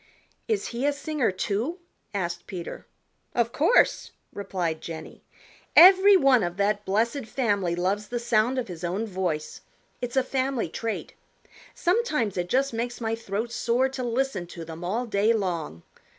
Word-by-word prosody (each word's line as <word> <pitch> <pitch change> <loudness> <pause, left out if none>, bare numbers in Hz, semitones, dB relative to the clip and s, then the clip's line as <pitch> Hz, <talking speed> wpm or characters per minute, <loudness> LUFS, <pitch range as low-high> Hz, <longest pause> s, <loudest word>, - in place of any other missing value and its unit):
"Is 435 -3 -1
he 245 +4 -1
a 290 - +2
singer, 290 -2 -1
too?" 215 - -2 0.3
asked 175 -4 -3
Peter. 175 -3 -7 0.5
"Of 235 -1 +1
course," 320 - +3 0.2
replied 180 -5 -3
Jenny. 160 -1 -8 0.5
"Every 380 +3 +9
one 270 -7 +5
of 175 -1 -3
that 205 +1 0
blessed 225 +6 0
family 205 -9 0
loves 195 +4 -1
the 240 - -3
sound 235 +1 +1
of 255 - -2
his 175 -2 -8
own 185 +6 -1
voice. 180 -7 -3 0.4
It's 245 +1 -3
a 265 - +4
family 260 -6 -1
trait. 225 +5 -4 0.6
Sometimes 330 - +1
it 180 0 -2
just 270 +2 +1
makes 240 +1 -3
my 225 -1 -1
throat 225 +1 -3
sore 240 +2 +1
to 265 -1 -5
listen 240 -6 -1
to 170 -1 -8
them 165 +1 -8
all 220 +8 -1
day 215 0 +2
long. 170 - -3
225 Hz, 155 wpm, -26 LUFS, 185-260 Hz, 0.6 s, Every